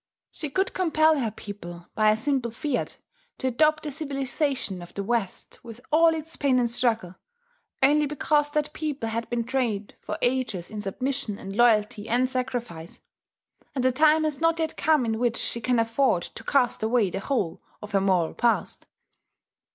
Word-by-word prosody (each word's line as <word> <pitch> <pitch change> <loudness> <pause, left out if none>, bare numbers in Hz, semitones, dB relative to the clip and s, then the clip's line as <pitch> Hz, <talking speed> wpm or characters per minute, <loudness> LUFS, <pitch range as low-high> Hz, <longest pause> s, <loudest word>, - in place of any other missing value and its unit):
She 300 - -5
could 380 +6 0
compel 315 -4 +3
her 235 -4 0
people, 175 -5 -9
by 215 -1 +3
a 215 - +3
simple 255 0 0
fiat, 255 +5 -3 0.4
to - - -5
adopt 305 +5 +2
the 300 - -4
civilization 275 - -2
of 175 0 -12
the 200 - -2
West, 225 -3 -3
with 230 -1 -10
all 325 +1 +5
its 320 +1 -6
pain 275 -3 +2
and 245 -1 +3
struggle, 230 -6 0 0.7
only 295 +2 +4
because 295 +1 +1
that 300 0 -1
people 290 -7 -3
had 230 +1 -3
been 240 -1 -1
trained 230 -5 -2
for - - -4
ages 245 -8 -1
in 215 -1 -5
submission 235 +1 -3
and 195 +1 -7
loyalty 215 -2 +3
and 250 +2 +2
sacrifice; 240 -10 -4 0.8
and 260 - 0
the 255 - +5
time 310 +3 +4
has 305 -1 -2
not 330 0 +3
yet 320 -1 -2
come 305 -5 +2
in 225 -1 -1
which 235 -1 +1
she 235 - -2
can 250 +2 +1
afford 230 -4 +2
to - - -9
cast 255 -4 +1
away 220 -3 +2
the 195 - -3
whole 200 -7 -2 0.2
of 210 - -8
her 195 -1 +2
moral 185 -4 +2
past. 235 -1 0
245 Hz, 175 wpm, -26 LUFS, 215-290 Hz, 0.8 s, all